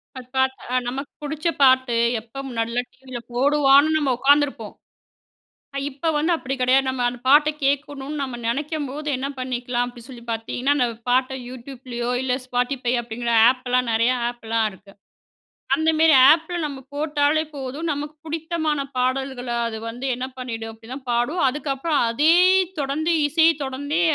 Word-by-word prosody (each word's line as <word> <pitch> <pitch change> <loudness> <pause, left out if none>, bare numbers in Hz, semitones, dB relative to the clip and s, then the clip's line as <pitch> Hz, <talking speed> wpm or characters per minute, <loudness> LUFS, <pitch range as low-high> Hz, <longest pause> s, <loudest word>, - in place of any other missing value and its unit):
பார்த்தா, 255 +1 -2 0.3
அ - - +2
நமக்கு 275 +3 -5
புடிச்ச 310 +3 -3 0.2
பாட்டு, 260 -2 +4 0.3
எப்போ 235 +4 -10
முன்னாடியலாம் 235 +1 -2
டிவியில 255 -2 -9
போடுவான்னு 280 +2 +4
நம்ம 280 -4 +1
உக்காந்துருப்போம். 285 +1 +2 1.0
அ - - 0
இப்ப 280 +5 -7
வந்து 325 +4 +1
அப்படி 270 -3 -4
கிடையாது. 265 +2 +4
நம்ம 255 -1 -3
அந்த 245 0 -5
பாட்ட 295 +2 +6 0.2
கேட்கணும்னு 285 +1 -2
நம்ம 260 -3 -4
நினைக்கும்போது, 295 +2 -3
என்ன 270 +2 -3
பண்ணிக்கலாம் 245 -1 -2
அப்படின்னு 245 0 -11
சொல்லி 235 -2 -11
பார்த்தீங்கன்னா, 245 +5 -1
அந்த 250 -3 +2 0.2
பாட்ட 260 +1 +2
YouTubeலயோ, 245 -1 -6
இல்ல 255 -1 0
Spotify 250 0 -1
அப்படிங்கிற 235 +1 -4 0.2
ஆப்லாம், 250 -1 -1
நிறைய 230 +3 +3 0.2
ஆப்லாம், 225 -2 -1
இருக்கு. 190 +1 -17 0.8
அந்தமாரி 315 0 +4 0.2
ஆப்ல 325 +2 +2
நம்ம 280 -3 -5
போட்டாலே 295 +1 +1
போதும். 275 +4 -5
நமக்கு 295 +1 -5
புடித்தமான 315 -2 -2 0.2
பாடல்கள 255 0 -1 0.2
அது 220 - -6
வந்து 245 +4 -5
என்ன 255 +1 -4
பண்ணிடும் 225 -3 -5
அப்டின்னா, 225 +4 -9
பாடும் 245 +9 0
அதுக்கப்புறம், 290 +2 -1
அதே 300 +8 +4 0.5
தொடர்ந்து, 300 +5 -1 0.2
இசைய 320 +2 +5
தொடர்ந்தே, 285 +5 -2
265 Hz, 140 wpm, -22 LUFS, 245-295 Hz, 1.0 s, பாட்ட